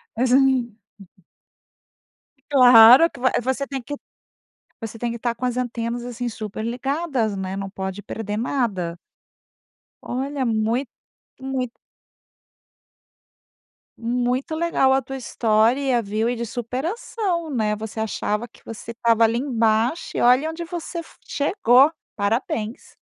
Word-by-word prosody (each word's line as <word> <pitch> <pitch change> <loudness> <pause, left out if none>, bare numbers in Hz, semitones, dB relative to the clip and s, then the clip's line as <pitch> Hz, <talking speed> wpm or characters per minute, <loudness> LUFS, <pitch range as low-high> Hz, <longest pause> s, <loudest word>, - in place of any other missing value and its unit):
É 240 - 0
sim, 250 - +4
hum. 255 -5 +2 1.8
Claro 250 +3 +8
que - - -14
a 255 -1 +1
você 260 +3 -1
tem 270 -2 -4
que 290 +4 -6 0.8
você 225 -1 -7
tem 240 - -1
que 235 - -5
estar 235 0 -1
com 255 - -4
as 250 0 -1
antenas 240 -1 -3
assim 245 0 -4
super 215 -1 -6
ligadas 255 -2 -1
né 190 0 -4
não 195 0 -4
pode 190 +1 -5
perder 210 -1 -4
nada. 210 -9 -1 1.0
Olha 270 +1 -3
muito 230 +3 0 0.5
muito 260 -2 -3 2.2
muito 245 +6 -1
legal 320 -5 +2
a 265 0 +3
tua 270 +2 -6
história 240 +2 +2
a - - -1
viu 215 +2 -1
e 245 - -1
de 235 0 -3
superação 335 - -3
né 215 -4 0
você 220 +1 -7
achava 220 +1 -2
que - - -23
você 225 0 -9
estava 230 -1 +2
ali 225 +1 +3
embaixo 235 +1 0
e - - 0
olha 255 +6 +4
onde 330 +1 -5
você 340 0 -5
f 330 - -11
chegou 285 - +3 0.2
parabéns. 220 +1 -2
245 Hz, 135 wpm, -22 LUFS, 225-270 Hz, 2.2 s, Claro